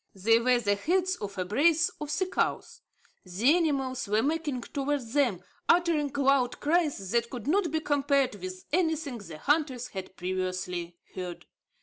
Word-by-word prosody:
They 225 +4 +4
were 250 +1 +3
the 205 -3 +1
heads 365 - +1
of 200 -1 -6
a 185 - -1
brace 310 - +3
of 300 - -4
sea 310 +6 0
cows. 370 - -2 0.4
The 210 - +3
animals 275 -8 0
were 210 +2 +2
making 295 -3 -1
towards 275 -4 -3
them, 240 -11 +1 0.3
uttering 335 -5 +3
loud 275 -3 +2
cries 295 - 0
that 235 0 +1
could 240 -4 -7
not 355 +3 +2
be 315 +1 -1
compared 280 -3 +2
with 185 -1 -8
anything 320 -7 0
the 170 -6 -9
hunters 275 - 0
had 190 -1 -8
previously 180 -1 -3 0.2
heard. 180 -2 -6
260 Hz, 155 wpm, -28 LUFS, 200-305 Hz, 0.4 s, They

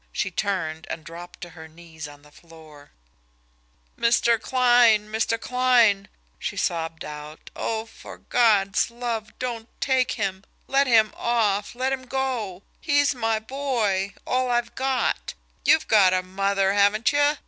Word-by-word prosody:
She 190 - -2
turned, 175 -5 -3
and 160 - -5
dropped 175 +2 -11
to 175 - -8
her 160 -1 -11
knees 160 -1 -11
on 145 0 -15
the 150 - -19
floor. 155 -3 -16 1.1
"Mr. 235 -1 +3
Kline, 240 -4 +4
Mr. 225 +1 0
Kline," 240 -6 +3 0.3
she - - -4
sobbed 165 -1 -2
out, 150 +1 -10
"oh, 220 -1 -3
for 225 - -12
God's 210 -5 +2
love, 235 -2 -5
don't 235 -2 -5
take 260 -2 +1
him! 195 -3 -3 0.2
Let 275 +1 +2
him 220 -3 +4
off, 215 -3 0
let 260 +2 -1
him 260 -1 -5
go! 245 -9 -3 0.2
He's 285 -3 +2
my 225 -3 0
boy 220 -6 -2
all 255 0 0
I've 240 -1 0
got! 265 0 -1 0.3
You've 315 - +4
got 190 -4 +5
a 185 - 0
mother, 195 +1 0
haven't 205 +2 +3
you? 290 +1 +3
215 Hz, 145 wpm, -24 LUFS, 185-245 Hz, 1.1 s, got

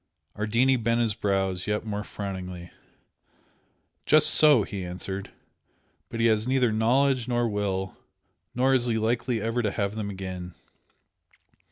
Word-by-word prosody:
Ardini 115 +5 +2
bent 115 +1 +1
his 115 -3 +1
brows 95 -3 -1
yet 105 +1 -1
more 105 -1 -3
frowningly. 90 -4 -7 1.4
"Just 155 0 +5
so!" 150 -8 +6
he 100 -1 -6
answered 95 +2 -6 0.8
"But 115 - -6
he 115 - +2
has 110 0 +2
neither 130 -3 +2
knowledge 125 +3 +2
nor 120 -1 +1
will 100 -3 -2 0.6
nor 130 +2 +3
is 125 -2 +3
he 115 -2 0
likely 115 +2 0
ever 115 +2 -1
to 105 - 0
have 100 0 -2
them 105 -2 -4
again. 95 -2 -7
110 Hz, 140 wpm, -26 LUFS, 100-120 Hz, 1.4 s, so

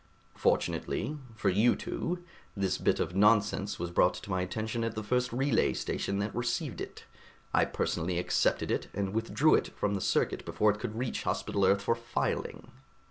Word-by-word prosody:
"Fortunately 150 +2 0 0.2
for 110 - +1
you 105 +6 +4
two 175 +1 -3 0.3
this 95 -2 0
bit - - +2
of 90 - -2
nonsense 105 -1 +3
was 90 0 -4
brought 90 +1 +3
to 100 +3 -8
my 95 0 +1
attention 110 +5 -2
at 115 -1 -2
the 110 - -3
first 125 +4 0
relay 135 +4 +2
station 100 - -2
that 105 +2 -2
received 120 - -2
it. - - -7 0.5
I - - +4
personally 85 +2 -1
accepted 90 - +1
it - - -1
and 100 0 -2
withdrew 115 +7 +3
it - - +3
from 100 - 0
the 100 - -2
circuit - - +1
before 105 0 +2
it 105 - -6
could 110 -2 -4
reach 125 0 -2
Hospital 100 - -1
Earth 100 +1 +3
for 115 - +3
filing." 115 0 -3
105 Hz, 180 wpm, -30 LUFS, 100-120 Hz, 0.5 s, you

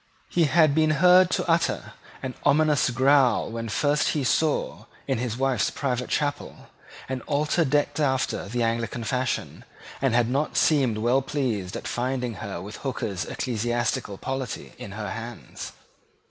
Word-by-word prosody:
He 170 -2 +3
had 155 -1 +4
been 155 +1 +3
heard 180 +2 +6
to 185 - -1
utter 165 0 0 0.3
an 130 -1 -3
ominous 150 -2 +3
growl 130 -2 +3
when 115 0 -4
first 145 +7 +1
he 145 - 0
saw, 150 +3 0 0.2
in - - -1
his 120 -2 -3
wife's 135 -1 +1
private 125 -3 -2
chapel, 145 -1 -3 0.4
an 130 -1 -3
altar 150 +3 +1
decked 145 +1 +1
after 130 -7 0
the 120 +2 -1
Anglican 115 +1 -1
fashion, 125 +2 -2 0.4
and 135 -3 +2
had 120 -1 +3
not 140 +5 -1
seemed 135 -8 +3
well 120 +5 +2
pleased 120 -10 -2
at - - -7
finding 125 -1 -2
her 100 -5 -5
with 100 +4 -8
Hooker's 105 -9 -3
Ecclesiastical 120 -3 -2
Polity 130 -4 -5
in 100 - -8
her 105 -2 -5
hands. 115 +2 -7
130 Hz, 150 wpm, -25 LUFS, 115-145 Hz, 0.4 s, heard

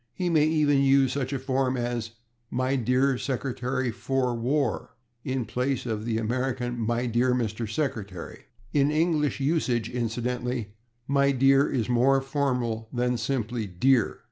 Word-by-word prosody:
He 180 -1 -1
may 155 -2 +4
even 150 -3 +3
use 135 -1 +4
such 135 -2 -2
a 140 - -1
form 130 0 0
as 120 -2 -3 0.4
/My 130 0 0
dear 130 +2 +2
Secretary 130 -1 -2
for 130 +2 -1
War/ 125 +1 -1 0.3
in 130 -2 -2
place 125 +4 -2
of 110 -2 -3
the 115 -1 0
American 120 +2 -2
/My 120 +1 0
dear 125 +2 +2
Mr. 110 -2 -2
Secretary/. 105 - -4 0.3
In 145 -1 +3
English 155 -2 +1
usage, 130 -6 0
incidentally, 120 -1 -2 0.3
/My 140 -1 +2
dear/ 135 +2 +4
is 120 -4 -1
more 125 +3 +3
formal 125 -5 -1
than 125 0 0
simply 120 -3 -2
/Dear 115 +6 +2
125 Hz, 145 wpm, -26 LUFS, 120-135 Hz, 0.4 s, may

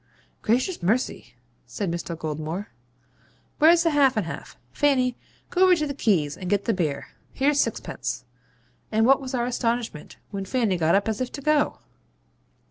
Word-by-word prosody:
'Gracious 255 - +1
mercy!' 220 +9 -1 0.3
says 205 - -3
Mr. 170 0 -4
Goldmore. 155 +4 -4 0.9
'Where's 330 +2 +6
the 330 - +2
half 275 -4 +4
and 210 - +1
half? 165 - -8
Fanny, 255 -4 +2 0.4
go 360 - 0
over 370 -1 +7
to 305 -3 -1
the 285 - -3
'Keys' 170 - +1
and 180 -2 -6
get 200 0 +1
the 230 - +2
beer. 155 -7 -2 0.2
Here's 285 +1 +2
sixpence.' - - -3 0.7
And 220 +1 +3
what 270 +2 +5
was 260 0 -4
our 240 -1 0
astonishment 235 -8 -2
when 195 -2 -4
Fanny 225 -3 +1
got 165 +1 +3
up 200 +2 +2
as 220 +1 -1
if 255 - -2
to 280 - -6
go! 300 0 +2
230 Hz, 165 wpm, -25 LUFS, 185-275 Hz, 0.9 s, over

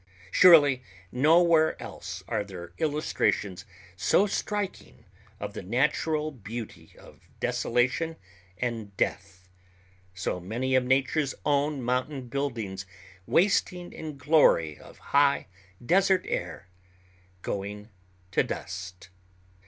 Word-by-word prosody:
Surely 145 -8 +7 0.3
nowhere 160 +3 +4
else - - -8
are - - -1
there 90 -4 -10
illustrations 145 - 0 0.3
so 100 - +3
striking 205 0 -4 0.3
of - - -5
the - - -6
natural 150 - 0
beauty 115 -3 -8
of - - -18
desolation 130 +7 0 0.4
and 110 -4 -4
death, 95 -1 -3 0.7
so 95 -1 -2
many 115 +9 -2
of 130 -1 +4
nature's 135 +3 +1
own 145 -1 +1
mountain 125 +2 -2
buildings 115 -8 -3 0.4
wasting 180 -1 +1
in 155 -3 -7
glory 130 - +4
of - - -15 0.2
high 140 0 +4 0.4
desert 190 +4 +3
air—going 95 +2 -7 0.4
to - - +3
dust. 90 0 -6
125 Hz, 100 wpm, -27 LUFS, 95-155 Hz, 0.7 s, Surely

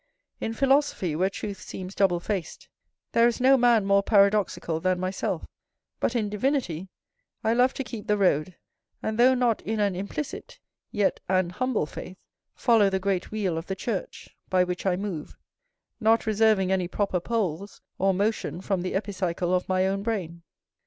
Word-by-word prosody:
In 225 - -3
philosophy, 270 - +2
where 185 +4 +2
truth 200 0 -6
seems 185 0 -7
double 190 -4 +2
faced, 185 -1 -4 0.4
there 230 0 +5
is 240 - -1
no 260 +2 +6
man 240 -5 +4
more 200 0 +4
paradoxical 200 -5 +2
than 185 +1 0
myself: 185 +1 -2 0.5
but 245 - 0
in 220 -3 +1
divinity 210 - -1 0.5
I 220 - +2
love 250 +2 +3
to 270 - -2
keep 225 -3 -8
the 210 - +2
road; 180 -3 +1 0.5
and, 220 +1 -2
though 255 +2 +6
not 245 -3 +1
in 220 0 -3
an 200 -3 +1
implicit, 200 +10 -5 0.3
yet 205 -4 0
an 185 -2 +2
humble 255 -3 0
faith, 185 +4 -9 0.4
follow 225 -5 +4
the 190 - 0
great 190 -1 -1
wheel 195 -6 -1
of 165 - -10
the 190 - -2
church, 195 -1 -5
by 185 -1 +4
which 180 +1 -3
I 180 - +3
move; 185 -5 -5 0.6
not 225 0 +3
reserving 215 -3 +3
any 185 -2 +1
proper 190 0 -1
poles, 200 -2 -3 0.2
or 195 +1 +3
motion 200 -1 -1
from 190 -1 -1
the 185 - -3
epicycle 185 -3 -1
of 180 0 0
my 185 0 +2
own 195 +1 0
brain. 185 -7 -3
200 Hz, 170 wpm, -26 LUFS, 185-220 Hz, 0.6 s, no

